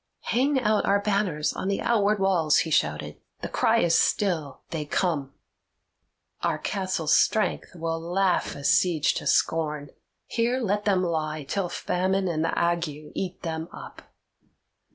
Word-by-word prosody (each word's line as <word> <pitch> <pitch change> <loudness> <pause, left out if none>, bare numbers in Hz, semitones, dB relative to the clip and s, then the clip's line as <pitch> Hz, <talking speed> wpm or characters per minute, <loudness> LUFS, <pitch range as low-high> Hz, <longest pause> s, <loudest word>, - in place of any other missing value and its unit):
"Hang 265 +3 +2
out 215 -3 +2
our 200 +1 +4
banners 200 -7 0
on - - -4
the 200 - 0
outward 210 -2 +2
walls," 180 -6 +3
he 160 - -5
shouted. 75 - 0 0.2
"The - - -3
cry - - +2
is 170 - +2
still, 165 -7 +1
'They 155 -2 -3
come.' 145 -4 -1 1.1
Our - - 0
castle's 185 -6 0
strength 210 -4 +1
will 165 -1 -2
laugh 180 +3 0
a 140 - -9
siege 160 +1 +3
to - - -4
scorn; 150 -3 +1 0.3
here 240 +2 0
let 210 -3 -1
them 190 -3 +2
lie 155 -3 -2
till 180 +6 -2
famine 190 +2 -1
and 160 -2 -1
the 165 - -1
ague 170 0 +1 0.3
eat 185 -1 -5
them 160 -1 -3
up." - - -10
175 Hz, 150 wpm, -26 LUFS, 160-200 Hz, 1.1 s, our